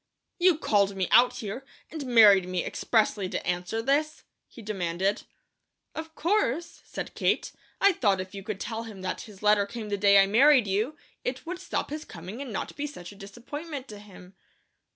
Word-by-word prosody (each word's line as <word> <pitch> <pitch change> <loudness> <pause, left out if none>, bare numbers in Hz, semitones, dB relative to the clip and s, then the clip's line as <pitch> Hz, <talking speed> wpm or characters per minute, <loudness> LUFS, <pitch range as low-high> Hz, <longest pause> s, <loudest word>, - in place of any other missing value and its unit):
"You 355 -2 +5
called 200 -8 +2
me 190 -2 -1
out 245 +1 +6
here, 235 +2 -6 0.3
and 315 -3 -5
married 210 -6 +7
me 180 -1 -1
expressly 210 -4 0
to - - -4
answer 180 +6 -2
this?" 295 +4 0 0.2
he 230 - -13
demanded. 190 0 -2 0.7
"Of 320 0 -7
course!" 340 - 0
said - - -6
Kate. - - 0 0.3
"I 400 - +6
thought 200 - +1
if 185 +1 -6
you 200 - -6
could 200 0 -5
tell 225 +1 -4
him 215 -5 -9
that 185 - -3
his 210 -2 -13
letter 210 -1 +4
came 220 -1 -7
the 205 - -1
day 200 0 +5
I 195 - +6
married 255 +5 +5
you, 215 +10 -1 0.3
it 255 +4 -4
would 355 +2 -5
stop - - -3
his 305 +1 -4
coming, 185 +9 -9
and 270 -4 -6
not 195 - -4
be 295 +1 -3
such 180 -12 -10
a - - -13
disappointment 260 +8 -8
to 210 -1 -9
him." 195 -2 -14
215 Hz, 190 wpm, -27 LUFS, 195-275 Hz, 0.7 s, married